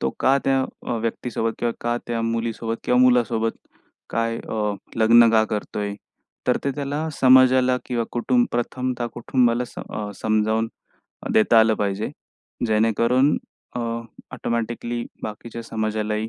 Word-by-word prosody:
तो 65 - 0
का 135 +1 +4
त्या 135 -1 +3 0.3
अ, 120 - -1
व्यक्तीसोबत 115 0 -2
किंवा 120 -1 0
का 120 0 0
त्या 115 -1 -2
मुलीसोबत 115 0 -2
किंवा 125 - +3
मुलासोबत 120 -3 +3 0.6
काय 115 0 0
अ, 105 -2 -2 0.2
लग्न 115 +1 +6
का 110 -1 +4
करतोय? 105 -1 -3 0.5
तर - - +3
ते 140 - +1
त्याना 145 +2 -3
समाजाला 130 0 +6
किंवा 120 -2 -1
कुटुंब 120 0 +2
प्रथमता 125 0 -2
कुटुंबाला 120 0 +1
स - - -15
अ, 105 -1 -5
समजावून 110 +1 +1 0.6
देता 110 +1 +5
आलं 110 0 +4
पाहिजे, 100 +1 -1 0.6
जेणेकरून 115 +5 +3 0.4
अ, - - -1 0.5
ऑटोमॅटिकली 120 +1 -3 0.2
बाकीच्या 115 +2 -6
समाजालाही 110 -1 -2
115 Hz, 130 wpm, -23 LUFS, 110-125 Hz, 0.6 s, लग्न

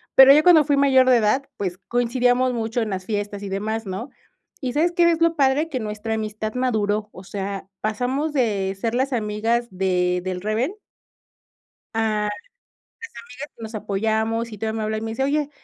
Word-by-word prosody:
pero, 270 +1 +10
ya 305 +1 +5
cuando 335 -4 +7
fui 290 - +2
mayor 265 -2 +5
de 250 - +6
edad, 245 +6 +1
pues, 185 -2 -3
coincidíamos 245 +1 +2
mucho 230 +1 -2
en 220 - -2
las 185 -1 -4
fiestas 205 -1 -3
y - - -4
demás, 215 +3 -3
¿no? 195 +8 -5 0.5
¿Y 250 -2 -2
sabes 330 +4 +2
qué 345 -1 +4
es 330 0 0
lo 335 0 +3
padre? 280 +4 +2
Que 260 -4 -3
nuestra 215 +1 -3
amistad 215 0 -4
maduró, 215 -4 0
o 185 - -11
sea, 195 0 -5
pasamos 255 +8 -1
de 200 -7 0
ser 230 +1 -1
las 265 +1 0
amigas 225 +2 0
de 180 -1 +1
del 185 -1 -3
reven 220 - -1 1.2
a 220 -1 0
las 210 - -1
amigas 205 - -10 1.1
que 225 - -11
nos 220 +1 -7
apoyamos, 220 +2 -1
y 210 - -8
todavía 220 +1 -3
me 215 - -2
habla 215 0 -1
y - - -5
me 225 0 -4
dice: 265 +4 -2
"Oye, 295 +1 0
225 Hz, 190 wpm, -22 LUFS, 210-260 Hz, 1.2 s, pero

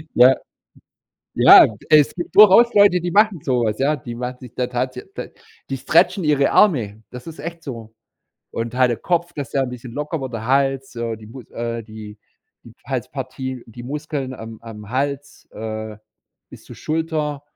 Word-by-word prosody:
Ja. 125 +2 +7 1.0
Ja, - - +9 0.2
es 150 -2 +5
gibt 175 - -6
durchaus 215 +4 +7
Leute, 200 -3 +5
die 175 0 -3
machen 210 -3 +3
so 125 -3 0
was, 110 +1 -2
ja? 145 +3 +2
Die 120 -4 -8
machen 125 +1 -5
sich 125 -2 -12
da 125 -1 -1
tatsä 125 +1 -3
d - - -7 0.4
die 135 - -3
stretchen 175 +7 +2
ihre 145 -2 +2
Arme. 110 - +2
Das 125 +4 -10
ist 160 - -9
echt 170 +1 -7
so. 115 -5 -8 0.6
Und 115 +1 -4
halt 125 -1 +3
der 120 - -1
Kopf, 175 0 -1
das 140 -4 -6
der 135 - 0
'n 130 - -5
bisschen 125 -1 -9
locker 150 +2 -4
wird, 130 -2 -6
der 115 0 -5
Hals, 135 0 0
so, 115 -1 -4
die 110 0 -14
Mus 125 +2 -12
äh, 115 0 -4
die 110 -1 -11 0.5
die - - -14
Halspartie, 130 -2 -5
die 120 +2 -11
Muskeln 140 -1 -5
am 110 -2 -10
am 105 -3 -10
Hals, 140 +2 -3
äh, 110 -1 -6 0.5
bis - - -14
zur - - -12
Schulter, 155 -2 -3
130 Hz, 180 wpm, -20 LUFS, 115-150 Hz, 1.0 s, Ja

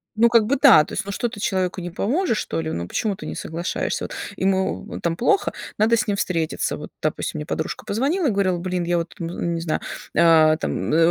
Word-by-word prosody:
ну 235 +2 +5
как 230 -2 +5
бы 275 +6 +1
да, 250 - +8
то - - -10
есть, 200 - -2
ну 200 - -4
что 240 +4 -1
ты 215 - -10
человеку 185 -2 -1
не 175 - -5
поможешь, 250 - 0
что 80 - -2
ли? 80 0 -3
Ну 85 +1 -4
почему 205 - -1
ты - - -10
не - - -5
соглашаешься? 170 +3 -3
Вот, - - -7 0.2
ему 190 0 -1
там 165 -1 0
плохо, 395 - +2 0.3
надо 225 +2 +4
с 250 - 0
ним 205 - +1
встретиться. 165 -5 -1
Вот, - - -8
допустим, 155 0 -2
мне 150 - -5
подружка 160 - -4
позвонила 285 - 0
и 245 - +2
говорила: 190 -3 +1
"Блин, 180 0 -2
я 175 0 +1
вот 170 0 -4
н 170 - -3
ну, 170 - -7
не 170 -1 -1
знаю, 160 -2 -1 0.4
а, 160 -2 +6
там, 95 - -2
э, - - +4
185 Hz, 240 wpm, -22 LUFS, 165-220 Hz, 0.4 s, да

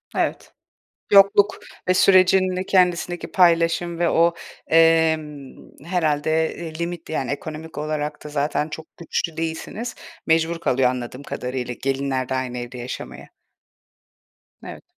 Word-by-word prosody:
Evet. - - -2 0.6
Yokluk 200 +1 +5 0.3
ve 185 - +4
sürecin 185 0 +4
de 185 +1 -3
kendisindeki 180 -2 +1
paylaşım 170 -1 +2
ve 170 - +2
o, 170 +1 +3 0.3
emm, 160 -4 +2 0.3
herhâlde, 160 -2 0
eee, 160 -2 -7
limitli, 170 -1 -5
yani, 130 -4 -2
ekonomik 155 +2 -7
olarak 150 0 -3
da 150 - -8
zaten 150 +1 -1
çok 160 +1 -10
güçlü 165 -1 -3
değilsiniz. 165 +8 -4 0.3
Mecbur 165 +1 +2
kalıyor, 130 -5 +2
anladığım 125 +1 -5
kadarıyla, 125 -2 -4
gelinler 135 -1 -1
de - - -1
aynı 125 -1 -3
evde 120 +1 -7
yaşamaya. 125 +1 -7 1.3
Evet. - - -9
160 Hz, 125 wpm, -22 LUFS, 140-170 Hz, 1.3 s, Yokluk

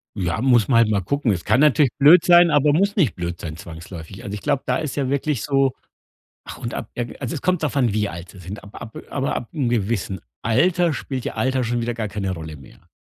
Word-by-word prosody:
Ja, 90 +1 -2
muss 125 -5 +4
man 125 -4 +3
halt 115 -2 +4
mal 100 -2 +1
gucken. 140 +1 0
Es 85 -4 -3
kann 130 - +3
natürlich 145 -3 +4
blöd 160 +5 +7
sein, 175 -1 +7
aber 145 0 +4
muss 200 +5 +1
nicht 145 - +2
blöd 85 -1 -4
sein 80 -2 -6
zwangsläufig. 85 +2 -10
Also 100 - -5
ich 105 - -5
glaube, 140 - 0
da - - +1
ist 150 -4 -4
ja 135 -2 0
wirklich 140 -4 -1
so 135 -2 +2 0.7
ach - - -9
und 115 - -5
ab 115 - -6
irgen 120 -1 -4
also 125 -3 -3
es 145 - -5
kommt 180 -3 +1
davon, 135 -7 +1
wie 105 -1 0
alt 85 0 -8
sie 95 - -15
sind. 95 +4 -8
Ab 100 - -12
ab 110 -2 -9
aber 135 -1 -2
ab 120 - -5
'n 135 -6 0
gewissen 100 -5 -1 0.2
Alter 165 +9 +2
spielt 130 -3 -5
ja - - -4
Alter 130 0 0
schon 120 +1 -1
wieder 120 0 -2
gar 110 -3 -3
keine 95 -2 -3
Rolle 80 -3 -7
mehr. 70 - -17
120 Hz, 245 wpm, -22 LUFS, 100-140 Hz, 0.7 s, blöd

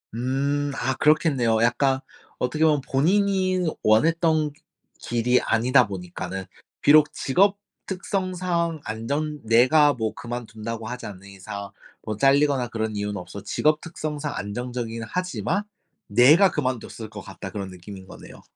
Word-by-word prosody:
음 140 +4 -1
아 130 +1 -1
그렇겠네요. 135 -7 +2
약간 130 +3 +2 0.4
어떻게 140 +5 0
보면 150 -3 +3
본인이 185 +5 +1 0.2
원했던 155 +6 +3
그 - - -27 0.4
길이 120 +1 +1
아니다 125 +2 +3
보니까는 95 0 -6 0.4
비록 150 +1 +6
직업 195 +8 +2 0.3
특성상 180 -4 -2
안정 140 +8 -3
내가 130 +7 +5
뭐 110 -4 -2
그만둔다고 115 -2 -6
하지 125 +2 -6
않는 100 -1 -9
이상 100 +1 -8 0.3
뭐 110 -1 -4
잘리거나 140 0 +3
그런 110 -1 -3
이유는 105 0 -3
없어 90 +2 -8
직업 155 0 +1
특성상 150 -3 -5
안정적이긴 115 +2 -4
하지만 180 - -2 0.4
'내가 145 - +6
그만뒀을 125 -5 -3
것 105 -1 -8
같다.' 95 +1 -8
그런 100 -1 -5
느낌인 95 +1 -11
거네요. - - -13
125 Hz, 305 characters per minute, -24 LUFS, 110-155 Hz, 0.4 s, 비록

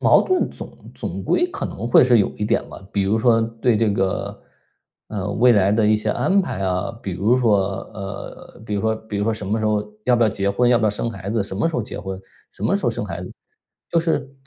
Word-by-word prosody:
矛 - - +5
盾 370 -1 +1
总 - - -11
总 - - -5
归 355 +1 +2
可 - - -4
能 110 +4 -5
会 120 - +6
是 120 -2 +5
有 100 - +3
一 105 - -2
点 110 - 0
吧， - - -10
比 100 - +1
如 105 +3 +1
说 115 0 +4
对 115 0 0
这 110 -1 +2
个， 95 -1 -2 0.7
呃， 100 -2 -3
未 125 +4 +4
来 100 -1 +3
的 110 0 +2
一 110 0 +4
些 105 0 -3
安 195 - +2
排 170 - -3
啊。 95 +3 -1
比 95 - -4
如 105 +8 +2
说 110 -5 +3 0.3
呃， 100 +1 -8
比 105 - -3
如 100 - 0
说 110 0 +1
比 110 -1 -7
如 100 - 0
说 115 -1 +1
什 105 - -7
么 110 +3 0
时 110 - 0
候 105 -1 +1 0.2
要 125 - +4
不 120 - +3
要 110 - +4
结 100 -2 -1
婚？ 120 +4 +2
要 120 - +5
不 110 - 0
要 105 - +3
生 115 +3 -2
孩 100 -2 -7
子？ 110 -1 0
什 95 -1 -6
么 115 +11 +1
时 165 - -6
候 120 - 0
结 - - -7
婚？ 95 -1 -5 0.3
什 - - -12
么 - - +2
时 - - -5
候 - - +3
生 - - -4
孩 - - -5
子？ - - -8 0.6
就 170 - +3
是 160 -5 -1
110 Hz, 280 characters per minute, -21 LUFS, 100-120 Hz, 0.7 s, 会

